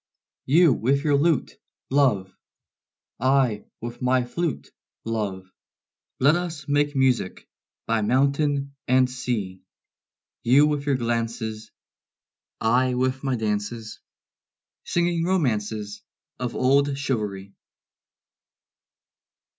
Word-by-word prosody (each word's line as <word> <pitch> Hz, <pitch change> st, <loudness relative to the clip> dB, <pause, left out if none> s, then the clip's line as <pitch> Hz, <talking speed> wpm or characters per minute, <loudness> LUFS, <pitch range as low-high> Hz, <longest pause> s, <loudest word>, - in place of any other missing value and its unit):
You 160 Hz, +1 st, +5 dB
with 140 Hz, +5 st, +1 dB
your 150 Hz, -2 st, +3 dB
lute, 150 Hz, 0 st, +1 dB, 0.3 s
love, 120 Hz, -10 st, +2 dB, 0.8 s
I 130 Hz, -4 st, +2 dB, 0.2 s
with 120 Hz, +2 st, -7 dB
my 125 Hz, 0 st, +2 dB
flute, 160 Hz, +5 st, -3 dB, 0.3 s
love, 100 Hz, -5 st, -3 dB, 0.7 s
Let 140 Hz, +5 st, +5 dB
us 165 Hz, -5 st, -4 dB
make 145 Hz, 0 st, +1 dB
music 130 Hz, -8 st, 0 dB, 0.4 s
by 115 Hz, -1 st, +1 dB
mountain 140 Hz, +4 st, +1 dB
and 130 Hz, 0 st, +4 dB
sea; 115 Hz, -7 st, -4 dB, 0.8 s
You 135 Hz, +5 st, +5 dB
with 145 Hz, -1 st, -1 dB
your 140 Hz, -, +3 dB
glances, 115 Hz, -2 st, -3 dB, 0.9 s
I 125 Hz, +3 st, +2 dB
with 130 Hz, +2 st, -1 dB
my 135 Hz, -2 st, 0 dB
dances, 110 Hz, 0 st, -3 dB, 0.9 s
Singing 175 Hz, -1 st, 0 dB
romances 110 Hz, -, -1 dB, 0.4 s
Of 125 Hz, -2 st, -3 dB
old 140 Hz, +2 st, +2 dB
chivalry. 105 Hz, -8 st, -3 dB
130 Hz, 95 wpm, -24 LUFS, 110-140 Hz, 0.9 s, You